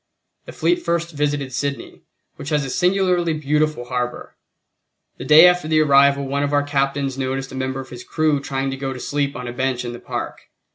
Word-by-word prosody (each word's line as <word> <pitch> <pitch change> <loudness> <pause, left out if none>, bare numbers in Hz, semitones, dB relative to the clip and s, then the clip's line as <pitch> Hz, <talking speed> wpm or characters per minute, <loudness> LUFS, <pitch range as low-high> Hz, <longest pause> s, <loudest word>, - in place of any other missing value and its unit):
The - - -9
fleet 350 0 0
first 170 0 -1
visited 145 -3 -2
Sydney, 140 +2 -4 0.3
which 140 - -7
has 150 -3 0
a 135 - -5
singularly 180 -1 +1
beautiful 150 -3 0
harbor. 125 -1 -4 0.8
The 125 - -7
day 150 +5 +8
after 180 -2 +2
the 155 0 +3
arrival 140 -1 +4
one 140 +1 -1
of 145 0 -1
our 145 0 +3
captains 135 -1 -1
noticed 135 0 -3
a - - -8
member 130 0 -3
of 130 - -12
his 125 -1 -9
crew 155 -2 0
trying 135 -1 -3
to 135 - -5
go 135 0 -3
to 130 - -8
sleep 140 +1 -2
on 125 -1 -6
a 120 - -5
bench 130 -1 -2
in 120 - -5
the 120 - -8
park. - - -6
140 Hz, 205 wpm, -21 LUFS, 130-155 Hz, 0.8 s, day